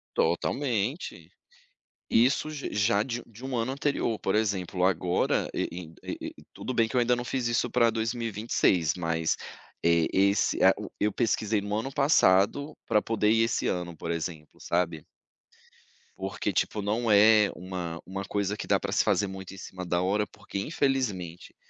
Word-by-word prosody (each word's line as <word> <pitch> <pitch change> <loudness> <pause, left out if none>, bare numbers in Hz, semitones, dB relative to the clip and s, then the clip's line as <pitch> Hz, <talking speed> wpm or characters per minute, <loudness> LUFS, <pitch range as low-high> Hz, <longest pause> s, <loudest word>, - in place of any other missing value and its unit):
Totalmente, 120 - -1 0.8
isso 130 +6 +3
j 150 -2 -5
já 105 0 +3
de 120 0 -4
de 115 +1 -15
um 130 -1 -2
ano 115 +3 -1
anterior, 140 -5 -1
por 95 - -1
exemplo, 95 -4 0
agora 90 -1 +1
e - - 0
e 85 -2 -8
e - - -6
e - - -14
tudo 130 - -5
bem 115 -1 +3
que 110 - -9
eu 125 - +4
ainda 120 0 +3
não 120 - -4
fiz 130 -1 -2
isso 120 0 0
para 120 -2 +4
2026, 110 -7 +1
mas 80 -2 0 0.5
é 85 -1 +3
esse 100 +1 +2
é - - +7
a - - +5
o - - -7
eu 105 - +2
pesquisei 110 -2 0
no 105 0 -3
ano 115 +5 -2
passado 140 +1 +3
para 105 - +3
poder 105 -1 +1
ir 115 +1 +4
esse 115 - -1
ano, 85 -2 -2
por 85 - -5
exemplo, 80 -2 -5
sabe. 85 -3 -1 1.1
Porque 95 +1 -3
tipo, 105 +4 0
não 110 +3 0
é 105 0 +6
uma 90 -3 -5
uma 95 +1 -5
coisa 100 0 -1
que - - -6
dá - - +3
para - - -4
se - - +3
fazer 100 - +2
muito 95 -1 -8
em - - -11
cima 95 -1 -7
da 85 0 0
hora, 105 +3 +1
porque 100 - -7
infelizmente, 105 - -2
105 Hz, 175 wpm, -28 LUFS, 90-115 Hz, 1.1 s, é